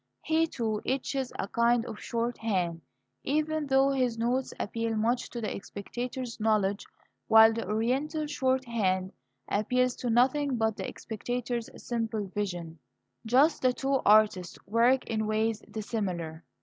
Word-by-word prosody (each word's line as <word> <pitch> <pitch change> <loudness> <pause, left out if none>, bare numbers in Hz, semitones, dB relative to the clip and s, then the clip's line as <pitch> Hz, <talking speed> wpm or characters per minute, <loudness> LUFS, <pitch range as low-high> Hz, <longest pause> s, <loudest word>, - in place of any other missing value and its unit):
He 320 +1 +2
too 220 -7 -2
etches 265 0 -2
a - - -2
kind 235 +2 +2
of 220 -3 -7
shorthand, 220 -8 -1 0.4
even 310 +1 0
though 270 0 +4
his 255 -4 0
notes 245 +3 0
appeal 230 +1 -2
much 230 +3 0
to 240 - -6
the 215 - -3
spectator's 240 +5 -6
knowledge, 210 -2 +1 0.4
while 220 0 +8
the 230 - -4
Oriental 265 +9 0
shorthand 235 -10 0 0.4
appeals 250 +4 +1
to 245 - -3
nothing 260 +3 +2
but 220 -1 +1
the - - -5
spectator's 240 +1 -4 0.2
simple 225 -3 -1
vision. 175 -6 -4 0.5
Thus 265 +8 +4
the 255 -1 +2
two 270 +1 0
artists 205 -4 +4
work 235 +5 +3
in 220 -1 -1
ways 220 0 0
dissimilar. 185 -7 -4
230 Hz, 135 wpm, -29 LUFS, 215-255 Hz, 0.5 s, while